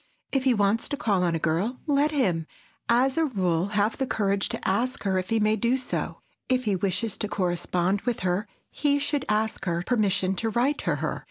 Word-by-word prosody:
If 270 -1 0
he 255 -2 +4
wants 205 +2 +1
to 285 - -2
call 210 -10 +1
on 170 -2 +1
a - - +1
girl, 170 +10 -1
let 290 0 +3
him, 185 - 0 0.4
as 260 +5 +3
a 325 - +3
rule, 185 - 0
have 210 +2 +2
the 265 - -1
courage 200 -3 0
to - - -4
ask 235 +7 0
her 190 -2 +1
if 185 - -5
he 225 -1 +2
may 215 0 +3
do 235 +4 +1
so; 255 - -4 0.3
if 255 -1 +2
he 205 -2 +2
wishes 190 +3 -1
to 210 - -2
correspond 180 0 0
with 245 0 -2
her, 185 +4 0 0.2
he 285 -1 +2
should 285 -1 -1
ask 215 0 0
her 170 -1 -1
permission 195 -5 +1
to 225 - 0
write 250 +6 +1
to - - 0
her. - - -3
215 Hz, 210 wpm, -26 LUFS, 185-255 Hz, 0.4 s, he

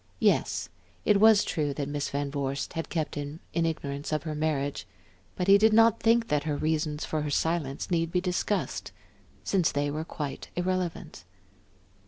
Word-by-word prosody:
Yes, - - +2 0.4
it 210 -2 +4
was 220 -1 +7
true 145 -4 -1
that 140 -1 -3
Miss 145 0 -2
Van 140 0 -2
Vorst 140 -1 -3
had 165 -1 -4
kept 160 -3 -2
him 145 +2 -5
in 165 -1 +1
ignorance 140 -3 -4
of 155 - 0
her 155 -2 -3
marriage; 150 -5 -2 0.5
but 180 - -1
he 200 +1 +7
did 220 +1 +5
not 225 0 +5
think 230 0 +3
that 150 0 +1
her 150 -2 -1
reasons 155 -1 -1
for 155 - -2
her 150 - -2
silence 155 0 -1
need 165 -1 +1
be 180 - +2
discussed, 185 +3 -2 0.5
since 185 -5 +2
they 145 0 -1
were 155 +2 -3
quite 150 -3 -6
irrelevant. 180 - -2
155 Hz, 175 wpm, -28 LUFS, 145-180 Hz, 0.5 s, was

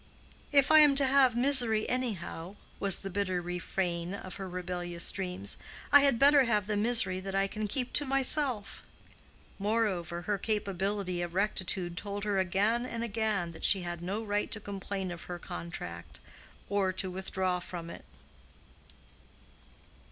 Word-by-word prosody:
"If 280 0 +4
I 310 - +9
am 295 -2 +7
to 275 0 +5
have 265 -2 +4
misery 240 -4 +4
anyhow," 200 -7 -3 0.2
was 200 -2 +4
the 195 - -5
bitter 185 -2 -1
refrain 175 0 -3
of 185 -2 -8
her 190 -2 -6
rebellious 175 -1 -1
dreams, 180 - -1 0.3
"I 285 - +9
had 275 -4 +3
better 280 +1 +6
have 210 -4 +1
the 210 +1 -2
misery 210 -3 +4
that 195 +1 -6
I 195 0 +2
can 210 +2 -4
keep 250 +4 -3
to 290 - +3
myself." 265 -4 0 0.8
Moreover, 195 -5 -1
her 205 0 -1
capability 195 -3 -2
of 175 0 -5
rectitude 185 -3 -2
told 205 0 -4
her 205 -2 0
again 200 +6 +1
and 235 -2 -4
again 210 -6 -1
that 165 - -12
she 195 -3 +2
had 175 -1 -5
no 200 +5 -3
right 205 -1 -1
to 220 - -4
complain 195 -2 -5
of 175 -1 -8
her 175 - -6
contract, 85 - -8 0.5
or 200 -2 0
to 185 0 -1
withdraw 185 -1 -2
from 170 -1 -8
it. - - -11
195 Hz, 155 wpm, -30 LUFS, 180-225 Hz, 0.8 s, I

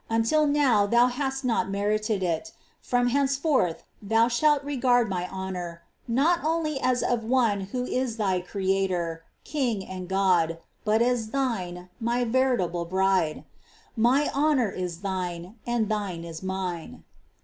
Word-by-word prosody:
Until 230 +7 +2
now 265 -8 +3
thou 235 +3 +5
hadst 270 +1 -2
not 230 -5 +1
merited 210 +1 0
it; 165 -3 -2 0.3
from 245 0 +1
henceforth 275 - +1 0.2
thou 225 +3 +3
shalt 290 +4 +3
regard 250 -4 +2
my 180 -2 -3
honour, 180 -3 -5 0.2
not 300 +9 +2
only 310 -2 0
as 255 -2 +1
of 240 -2 0
one 230 -4 +2
who 250 -1 -1
is 250 -3 -2
Thy 190 -4 +1
Creator, 185 -3 -1 0.2
King, 240 -10 -1
and 185 -1 -7
God, 180 -4 +2 0.3
but 220 +1 +3
as 240 -2 0
thine. 185 -10 -2
My 240 +1 0
veritable 230 -9 +1
bride; 185 -3 +1 0.5
My 255 +6 +3
honour 280 -7 +2
is 180 -2 -5
thine, 185 0 -4
and 240 -2 +1
thine 200 -6 -3
is 165 -1 -7
Mine." 185 -3 -4
220 Hz, 140 wpm, -26 LUFS, 185-255 Hz, 0.5 s, thou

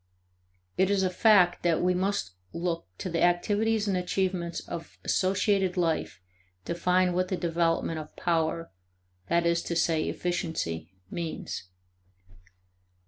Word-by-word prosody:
It 190 0 +4
is 200 -1 +2
a 185 - +1
fact 180 -2 +5
that 170 -2 +2
we 180 0 +2
must 185 - -1 0.2
look 170 - -2
to - - -4
the 170 -2 -1
activities 205 +5 +2
and 195 - +1
achievements 180 -1 -1
of 165 - -8
associated 190 0 +1
life 165 - 0 0.5
to - - -2
find 180 +1 +2
what 185 +1 +1
the 185 - -2
development 165 -1 0
of 155 0 -10
power 165 0 0 0.6
that 170 0 +2
is 170 0 +2
to 170 - -3
say, 165 -1 +1
efficiency 160 - -2 0.2
means. 165 - -4
175 Hz, 135 wpm, -28 LUFS, 165-185 Hz, 0.6 s, fact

